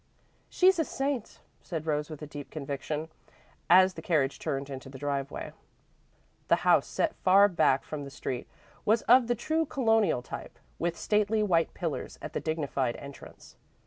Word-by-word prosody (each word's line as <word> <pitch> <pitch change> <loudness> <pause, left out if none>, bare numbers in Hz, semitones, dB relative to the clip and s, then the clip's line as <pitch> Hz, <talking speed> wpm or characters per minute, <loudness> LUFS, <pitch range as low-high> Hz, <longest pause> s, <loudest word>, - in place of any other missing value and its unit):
"She's 370 -1 +4
a - - +4
saint," 270 -5 -3 0.2
said 160 -4 -5
Rose 150 -1 -1
with 150 -1 -7
deep 145 -1 -8
conviction, 150 +2 -4 0.6
as 185 +1 +7
the 160 - -8
carriage 150 -5 +1
turned 135 0 -3
into 135 -1 -8
the 135 - -10
driveway. 140 0 -3 1.0
The - - +2
house, - - +5
set 325 - 0
far 195 +2 +6
back 170 -8 +2
from 150 -2 -6
the 140 - -7
street, 130 -2 -5 0.4
was 220 +2 +2
of 245 0 +6
the 240 - +1
true 315 +7 0
Colonial 225 - +2
type, - - -8 0.2
with 170 0 -1
stately 215 +1 +1
white 170 -5 +1
pillars 165 -5 -4
at - - -8
the - - -1
dignified 140 -6 -1
entrance. 140 0 -12
160 Hz, 160 wpm, -29 LUFS, 140-215 Hz, 1.0 s, as